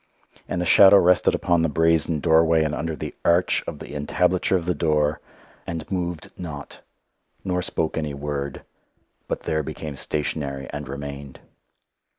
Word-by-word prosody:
And 90 - -2
the 90 - -1
shadow 100 +3 +8
rested 90 -1 +4
upon 85 -2 +1
the 80 - +1
brazen 80 0 +2
doorway, 80 -1 +4
and 75 -1 -1
under 80 +3 -3
the - - -6
arch 85 +2 +2
of - - -5
the - - -10
entablature 90 +6 +1
of 85 - -5
the 90 - +1
door 75 -3 +1 0.5
and 85 0 -5
moved 90 -4 -3
not, 80 -5 -8 0.6
nor 90 -2 -1
spoke 80 -2 -2
any 75 -2 -3
word, 70 -1 -4 0.6
but - - -3
there 80 0 0
became 75 0 -6
stationary 70 -1 -3
and 75 -1 -6
remained. 70 0 -7
80 Hz, 155 wpm, -23 LUFS, 75-85 Hz, 0.6 s, shadow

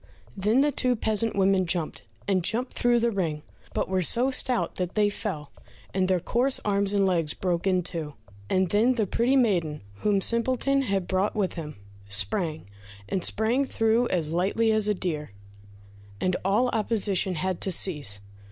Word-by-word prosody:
Then 210 +7 +2
the 295 +1 +2
two 250 -2 +1
peasant 220 0 0
women 190 -1 +2
jumped, 165 -2 -2 0.3
and 190 -3 +1
jumped 240 +7 -1
through 240 0 +2
the 235 0 +1
ring, 165 -7 -2 0.3
but - - -1
were 185 0 0
so 240 - +2
stout 255 -1 0
that 180 -1 -3
they 210 -1 +3
fell, 155 -9 -5 0.4
and 185 -1 +1
their 185 -1 +2
coarse 245 +9 +1
arms 200 -1 +1
and 200 -1 +2
legs 165 -5 0
broke 180 0 -1
in 185 -1 +2
two. 160 -4 -4 0.3
And 185 -1 +1
then 230 +5 +3
the 220 -3 +1
pretty 235 +7 +1
maiden 175 - +1 0.2
whom 205 - +1
Simpleton 255 +6 +1
had 195 -7 -1
brought 190 +2 0
with 200 -4 0
him, 155 -3 -7 0.3
sprang, 110 - -2 0.4
and 190 -3 -2
sprang 230 +5 +1
through 230 -2 +1
as 160 -4 -1
lightly 205 +6 +1
as 215 -1 +2
a 210 - +1
deer, 150 - -4 0.9
and 185 -1 0
all 210 +7 +2
opposition 205 -4 0
had 185 +2 -2
to 190 - 0
cease. 145 - +1
195 Hz, 170 wpm, -26 LUFS, 175-225 Hz, 0.9 s, they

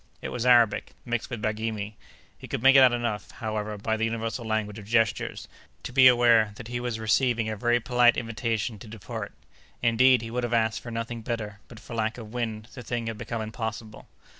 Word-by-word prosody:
It - - -5
was 125 0 -2
Arabic, 120 -4 +4
mixed 120 -2 -2
with 120 -5 -6
Baghirmi. 110 -1 -2 0.4
He - - -11
could - - -4
make 135 +1 +7
out 130 -2 +8
enough, 120 -4 -2
however, 105 -1 -4
by 110 +2 -1
the 110 - -2
universal 115 +1 -3
language 110 -1 -2
of 100 - -12
gestures, 115 -1 0 0.4
to 125 - -7
be 130 0 +8
aware 120 -4 +5
that 120 +1 -9
he 120 0 -3
was 120 -2 -3
receiving 115 +1 +1
a 110 - -3
very 120 +3 +2
polite 120 0 +4
invitation 115 -1 -2
to 110 - -11
depart. 105 -3 -7 0.5
Indeed, 120 +1 +4
he 115 - -6
would 125 +1 -1
have 120 0 0
asked 110 -1 +1
for 120 - -8
nothing 115 0 -4
better, 110 -2 -4
but 115 - -12
for - - -11
lack 110 0 -1
of 110 -2 -10
wind, 115 -2 -4
the 130 - -8
thing 120 0 -3
had 115 -2 -5
become 115 -2 -4
impossible. 110 0 -6
115 Hz, 205 wpm, -26 LUFS, 110-120 Hz, 0.5 s, out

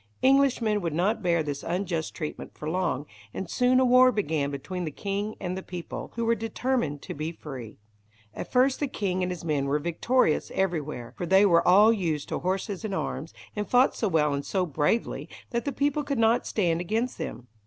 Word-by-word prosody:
Englishmen 260 -6 +3
would 165 -4 -2
not 205 +7 +1
bear 170 -3 +2
this 145 -2 -4
unjust 175 -2 -2
treatment 155 -2 -6
for 150 - -7
long, 160 -4 -1 0.3
and 190 - -4
soon 250 +6 +3
a 260 - +4
war 255 +1 +6
began 160 - -1
between 180 +6 -5
the 160 - -2
king 200 +6 -3
and 180 0 -3
the 190 - -4
people, 180 -2 -7
who 230 0 -1
were 230 - +4
determined 225 - -2
to - - -6
be 155 +3 -4
free. 130 -9 -9 0.6
At - - -7
first 260 +1 +3
the 290 - 0
king 190 -7 -2
and 180 0 0
his 175 -2 -6
men 145 -4 0
were 140 +2 +1
victorious 170 - +1
everywhere, 155 -10 -2
for 175 - -3
they 190 +3 +6
were 170 -3 +4
all 205 +5 +7
used 165 -8 -2
to - - -2
horses 190 +2 -2
and 205 -3 -2
arms, 160 -3 -3 0.2
and 210 -1 -3
fought 250 +2 +5
so 220 - 0
well 150 -5 +2
and 140 0 -2
so 185 +3 0
bravely 155 +8 -1 0.2
that 235 -1 -1
the 285 - 0
people 285 +2 0
could 280 -2 -2
not 225 +1 +3
stand 175 -5 +1
against 225 +7 -2
them. 125 - -5
185 Hz, 205 wpm, -27 LUFS, 160-230 Hz, 0.6 s, all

